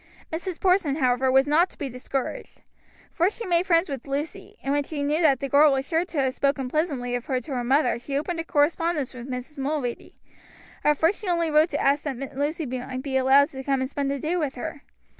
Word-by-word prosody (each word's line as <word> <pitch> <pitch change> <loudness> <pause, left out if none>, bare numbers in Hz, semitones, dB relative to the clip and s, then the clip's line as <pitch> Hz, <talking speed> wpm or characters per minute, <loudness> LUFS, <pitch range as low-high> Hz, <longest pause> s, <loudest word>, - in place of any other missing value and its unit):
Mrs. 345 +1 -4
Porson, 365 -6 +2
however, 260 -2 +2
was 265 +1 +5
not 330 +5 +4
to - - -17
be 285 - -3
discouraged. 255 +1 -5 0.5
First 365 +4 +1
she 465 - -5
made 350 0 +1
friends 335 0 +3
with 275 -4 -6
Lucy, 285 +3 -5
and 275 - 0
when 290 0 +1
she 290 0 -4
knew 300 +3 +1
that 290 -5 +4
the 275 - -1
girl 285 +2 +6
was 270 0 -1
sure 330 +1 +1
to 345 - -8
have 260 -1 0
spoken 275 -1 0
pleasantly 280 -5 -1
of 245 -1 -3
her 260 -2 0
to 270 +3 -7
her 245 -1 -1
mother 265 0 +2
she 275 +3 -3
opened 330 +3 -2
a - - -1
correspondence 305 -2 +1
with 250 +1 -9
Mrs. 255 +3 -6
Mulready. 270 -3 -3 0.7
At 300 -1 +3
first 335 +8 +1
she 420 - -6
only 340 -2 +1
wrote 305 +2 +4
to 290 - -2
ask 280 +1 +2
that 270 -1 -5
Lucy 295 +3 -1
might 255 0 -5
be 275 -2 -3
allowed 270 +2 +5
to 265 -1 -8
come 275 0 +1
and 260 - -1
spend 280 -1 -1
the 280 - -1
day 310 +6 -2
with 300 -6 -1
her. 290 +2 -6
285 Hz, 235 wpm, -25 LUFS, 265-320 Hz, 0.7 s, girl